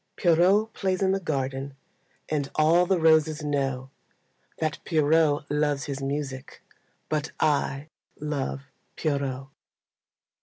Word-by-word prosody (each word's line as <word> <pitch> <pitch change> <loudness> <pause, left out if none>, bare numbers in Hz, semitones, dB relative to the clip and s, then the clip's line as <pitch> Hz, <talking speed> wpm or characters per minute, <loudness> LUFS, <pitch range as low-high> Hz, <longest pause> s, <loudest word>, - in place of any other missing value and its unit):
Pierrot 185 +6 +3
plays 190 -1 -1
in 190 - +3
the 195 - +1
garden, 135 -4 -3 0.5
And 145 -3 -1
all 165 +3 +4
the 190 - +3
roses 160 -1 +3
know 135 -3 -2 0.7
That 155 -1 -2
Pierrot 155 -1 +3
loves 145 -2 +1
his 140 0 -5
music, 135 -1 -5 0.4
But 150 -1 -2
I 145 -2 +1 0.3
love 140 -2 -3 0.3
Pierrot. 135 -3 -2
150 Hz, 110 wpm, -26 LUFS, 140-160 Hz, 0.7 s, all